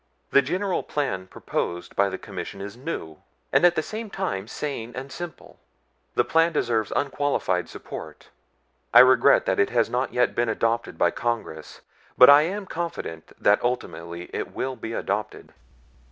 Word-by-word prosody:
the 140 - +6
general 185 +7 -1
plan 95 -11 -3
proposed 90 -1 -4
by 100 0 +3
the 95 - -4
Commission 100 - -7
is 100 +2 -7
new, 120 - -6 0.3
and - - +4
at 175 -1 +6
the 155 - 0
same 220 +3 -6
time 105 - -3
sane 120 -2 -5
and 135 +2 -6
simple. 175 +3 -9 0.6
The - - +4
plan 165 +1 +3
deserves 115 -6 0
unqualified 140 -10 0
support. - - -9 0.7
I 120 - +12
regret 130 0 +5
that - - 0
it - - +3
has - - +1
not - - -1
yet - - +2
been 120 0 0
adopted 115 -5 -1
by 85 - +3
Congress, 115 -9 -4 0.4
but 125 +2 +10
I 145 +1 +8
am 195 +6 -2
confident 165 - -5
that 105 0 +4
ultimately 85 -8 -3
it - - -4
will 130 0 -2
be 115 -1 -6
adopted." 105 -1 -3
120 Hz, 160 wpm, -25 LUFS, 100-150 Hz, 0.7 s, I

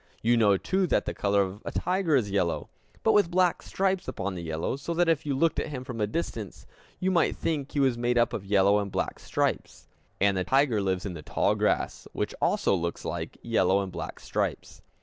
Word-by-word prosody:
You 120 +2 +4
know, 105 -4 +4
too, 190 - 0
that - - +1
the - - -3
color 100 0 +2
of 95 +2 -6
a - - -5
tiger 180 -4 +1
is 110 -7 +1
yellow, 90 -4 0 0.3
but 220 - +4
with 205 -5 +4
black 180 0 +2
stripes 190 -1 -1
upon 100 +1 -3
the 90 - -5
yellow, 80 +6 -2
so 140 +5 -4
that 175 0 +3
if 160 -3 +1
you 140 - 0
looked 165 +4 +2
at - - -2
him 130 -4 -5
from 125 -4 -6
a 105 - +2
distance, 110 - -4 0.3
you 185 +1 +1
might 170 -3 +2
think 145 -4 -2
he 145 - 0
was 130 -4 +2
made 120 0 +1
up 120 -1 +3
of 100 - -3
yellow 100 +1 +4
and 100 -1 -4
black - - -2
stripes. - - -2 0.3
And 100 0 +3
the 95 - 0
tiger 130 -2 +2
lives 95 -1 -1
in 95 - -3
the 80 - -7
tall - - +1
grass, - - -1
which - - -2
also - - +2
looks 85 -2 -2
like - - -4
yellow 100 -4 +2
and 95 - -6
black - - -6
stripes. - - -3
115 Hz, 225 wpm, -27 LUFS, 100-160 Hz, 0.3 s, You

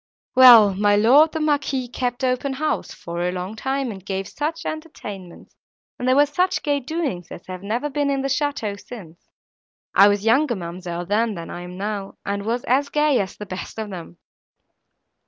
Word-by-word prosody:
Well! 240 -6 +9
my 205 +1 +3
lord 265 +10 +5
the 320 - -3
Marquis 290 -4 0
kept 245 +1 -3
open 255 +2 0
house, 305 +3 -2
for 170 0 -6
a 180 0 0
long 185 +3 -5
time, 265 +2 -2
and 190 -3 -10
gave 195 0 -3
such 320 +3 -4
entertainments 205 - -8 0.4
and 250 - -2
there 255 - +4
were 290 +1 +6
such 360 +6 0
gay 290 -1 +1
doings 275 - -3
as - - -10
have 185 -1 -7
never 225 +8 -2
been 290 0 -1
in 275 -1 0
the - - 0
château 265 -7 -2
since. 175 -9 -12 0.6
I 200 - +7
was 205 0 +1
younger, 245 +3 +3
ma'amselle, 175 -1 -6
then, 215 +3 0
than 170 -1 -7
I 175 - -6
am 180 +1 -9
now, 200 0 -4
and 200 +1 -3
was 240 +2 -1
as 280 +3 +1
gay 300 -3 +2
at 190 -2 -3
the 210 - -7
best 185 +2 -7
of 215 -2 -5
them. 175 -1 -9
225 Hz, 190 wpm, -22 LUFS, 195-280 Hz, 0.6 s, Well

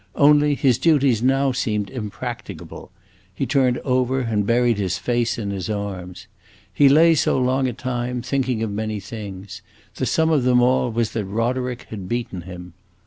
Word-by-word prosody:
Only, 145 0 +4
his 130 -3 +2
duties 140 -7 +3
now 135 +2 +2
seemed 105 -5 -2
impracticable; 110 -6 -7 0.5
he 135 - -1
turned 130 -3 +2
over 130 0 +1
and 105 -4 -1
buried 120 -2 +2
his 95 -2 -1
face 120 +5 -1
in 100 -3 -3
his 95 0 -4
arms. 95 -3 -5 0.5
He 140 +8 +5
lay 165 +4 +6
so 160 -3 +1
a 130 - +1
long 130 0 +1
time, 125 -1 -3
thinking 130 -3 -1
of 110 - -2
many 110 0 -3
things; 100 -1 -8 0.4
the 130 - -1
sum 160 0 +2
of 150 -4 +3
them 125 0 +4
all 125 0 +2
was 115 -1 -1
that 110 -3 -3
Roderick 120 +4 -2
had 100 -4 -7
beaten 120 -6 -3
him. 90 -1 -9
120 Hz, 170 wpm, -22 LUFS, 105-130 Hz, 0.5 s, lay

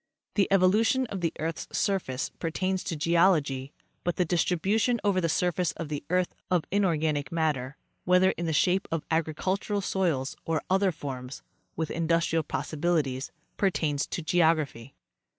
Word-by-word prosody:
The 200 -3 +3
evolution 210 +7 +4
of 195 - -4
the 165 - +1
earth's 160 0 -3
surface 175 -10 -1
pertains 185 +3 -1
to 170 - -2
geology, 150 -5 +2 0.3
but 175 - 0
the 180 - +1
distribution 195 +8 +1
over 200 -3 +2
the 165 - 0
surface 180 +1 +1
of 165 -3 -6
the 145 -2 -4
earth 180 0 +1 0.2
of 180 -4 +2
inorganic 160 -8 +1
mat 160 -2 +2
ter, 130 +1 -7 0.3
whether 180 +1 +4
in 170 - -4
the - - 0
shape 180 +5 +2
of 165 -2 -2
agricultural 185 +6 0
soils 170 -9 0
or 160 -2 -1
other 190 0 +3
forms, 130 -4 -7 0.3
with 160 -1 -2
industrial 165 0 +1
possibilities, 150 -4 -1 0.3
pertains 155 -7 0
to 170 - -4
geography. 155 -7 +1
165 Hz, 150 wpm, -28 LUFS, 150-185 Hz, 0.3 s, evolution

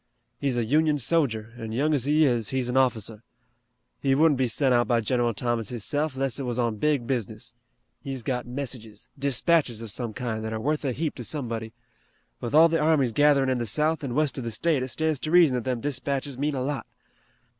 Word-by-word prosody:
He's 135 -3 0
a 120 - +1
Union 150 +4 +2
sojer, 120 -7 0
an' 110 -1 -5
young 150 +6 +1
as 135 -4 +1
he 150 +2 +4
is, 120 -5 +1
he's 130 -2 -1
an 125 - -2
officer. 115 -5 +1 0.8
He 135 -1 +2
wouldn't 150 -2 +4
be 130 - +2
sent 130 +3 +1
out 120 0 +3
by 120 -2 +2
General 120 0 0
Thomas 120 -2 -1
hisself 145 +5 -2
'less 135 -1 -1
it - - -3
was 120 -2 -3
on 120 -3 0
big 145 0 +1
business. 120 -5 -4 0.5
He's 135 -3 -5
got 125 -1 -2
messages, 120 -5 -6
dispatches 140 -2 +2
of 115 -2 -6
some 115 -1 -4
kind 115 -4 -3
that 110 0 -4
are 110 - -3
worth 150 +7 -1
a 135 - +1
heap 150 +5 -2
to 125 - -6
somebody. 115 -4 -3 0.7
With 120 +4 -3
all 160 +2 +8
the 165 0 0
armies 150 -5 +3
gatherin' 145 +1 +4
in 130 -1 0
the 120 - -2
south 155 +8 +1
an' 125 -3 -3
west 150 -2 0
of - - -5
the 115 - -3
state 145 +5 0
it 130 - -2
stands 155 +3 -1
to 155 - -4
reason 170 -5 +6
that 125 -2 -2
them 125 -3 -1
dispatches 140 0 -2
mean 145 +3 -1
a 130 - -2
lot. 135 -4 -3
130 Hz, 220 wpm, -26 LUFS, 120-145 Hz, 0.8 s, all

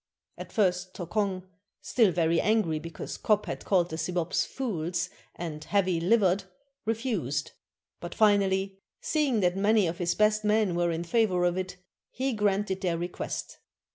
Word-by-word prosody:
At - - -9
first, 185 -4 0
Tokong, 185 +1 -2 0.4
still 225 -6 +3
very 165 -1 +2
angry 210 -8 +1
because 165 0 -7
Kop 210 -1 +2
had - - -5
called 175 -4 +2
the 160 - -3
Sibops 175 0 0
'fools' 180 -8 -3 0.2
and 155 -3 -6
'heavy 185 0 +1
livered,' 195 0 +3 0.4
refused; 215 - -1 0.5
but 175 - -7
finally, 195 -2 +2 0.2
seeing 280 -8 +1
that 180 -1 +2
many 205 +1 +3
of 170 0 -3
his 175 -1 0
best 215 0 +3
men 210 -3 +2
were 175 0 +1
in 165 0 -2
favor 180 -1 +2
of 175 0 +1
it, 185 -1 -4 0.3
he 265 +1 -2
granted 205 -2 0
their 175 -3 0
request. 175 +1 -5
185 Hz, 150 wpm, -28 LUFS, 175-210 Hz, 0.5 s, still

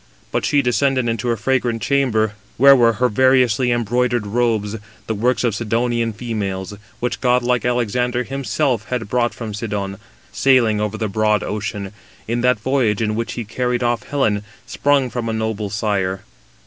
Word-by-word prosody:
But - - -1
she 145 -1 +2
descended 130 +1 +1
into 115 +1 -2
her 115 -1 +1
fragrant 120 0 0
chamber, 110 -6 +1 0.2
where 140 +2 +8
were 120 -3 +4
her 125 +4 +1
variously 125 0 +3
embroidered 120 0 0
robes, 110 -1 0 0.3
the 110 - -2
works 120 +5 +1
of 120 -3 +1
Sidonian 115 +1 0
females, 105 -4 -4 0.3
which 120 0 -2
godlike 125 -1 +2
Alexander 125 +1 0
himself 135 -2 -1
had 120 -1 -3
brought 120 0 0
from 110 -3 -6
Sidon, 100 -3 -4 0.3
sailing 120 -6 +3
over 105 +1 -2
the 110 - -1
broad 105 +1 +1
ocean, 105 -1 -4 0.3
in 120 +2 -1
that 125 -2 +2
voyage 120 -3 +1
in 105 -1 0
which 115 +1 -3
he 120 - -5
carried 125 +2 -1
off 120 0 +1
Helen, 110 -8 0 0.2
sprung 140 -3 +1
from 120 -2 -3
a - - -1
noble 110 -2 -2
sire. 95 -3 -1
115 Hz, 160 wpm, -20 LUFS, 105-125 Hz, 0.3 s, where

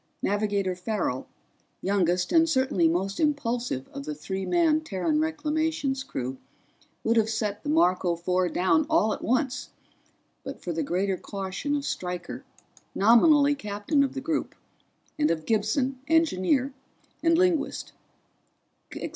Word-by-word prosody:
Navigator 200 -2 0
Farrell, 180 - -2 0.5
youngest 180 -2 +1
and 330 -1 +4
certainly 260 - +2
most 190 +4 -1
impulsive 245 - -1
of 140 - -7
the 150 0 -4
three 190 +6 -4
man 325 -3 +3
Terran 300 - -1
Reclamations 315 -2 -1
crew, 130 - -5 0.6
would 230 +1 +2
have 220 -1 +3
set 215 -2 -2
the 290 - -5
Marco 185 - +3
Four 180 +1 0
down 185 - +2
at 220 -10 +2
once 255 +1 0 0.7
but 270 +1 -7
for 175 - -3
the 165 - -1
greater 185 +5 0
caution 195 +11 -4
of 285 -1 -2
Stryker, 180 +7 -4 0.5
nominally 285 +7 +5
captain 210 +4 0
of 270 - -2
the 270 - -3
group, 315 +2 -2 0.6
and 300 - +3
of 160 -1 -1
Gibson, 230 +5 0
engineer, 280 - +2 0.5
and 330 0 +3
linguist. 350 -5 0
225 Hz, 130 wpm, -26 LUFS, 185-295 Hz, 0.7 s, nominally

